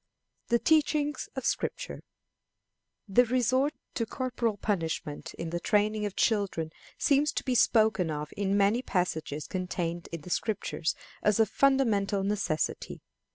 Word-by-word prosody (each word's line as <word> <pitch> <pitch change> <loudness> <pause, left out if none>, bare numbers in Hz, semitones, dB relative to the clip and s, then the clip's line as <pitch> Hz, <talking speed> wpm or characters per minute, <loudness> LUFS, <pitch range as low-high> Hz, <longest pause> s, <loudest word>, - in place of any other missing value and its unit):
The 235 - +4
Teachings 300 +1 +2
of 265 - -4
Scripture. - - -2 1.1
The 230 +6 +5
resort 255 +4 +2 0.2
to 230 -3 -1
corporal 240 -3 -2
punishment 165 -7 -3
in 165 -1 -5
the 175 - -1
training 210 +3 +1
of 200 - -8
children 195 -8 +1 0.3
seems 290 0 +3
to - - -2
be 255 - 0
spoken 215 -7 +3
of 150 -1 -4
in 200 0 +1
many 205 +4 +3
passages 160 - -2
contained 175 -2 -3
in 165 -2 -5
the 180 - -9
Scriptures 200 -7 -1 0.3
as 210 +1 +2
of 220 -2 +4
fundamental 220 -8 +2
necessity. 195 -6 -2
205 Hz, 135 wpm, -29 LUFS, 175-245 Hz, 1.1 s, The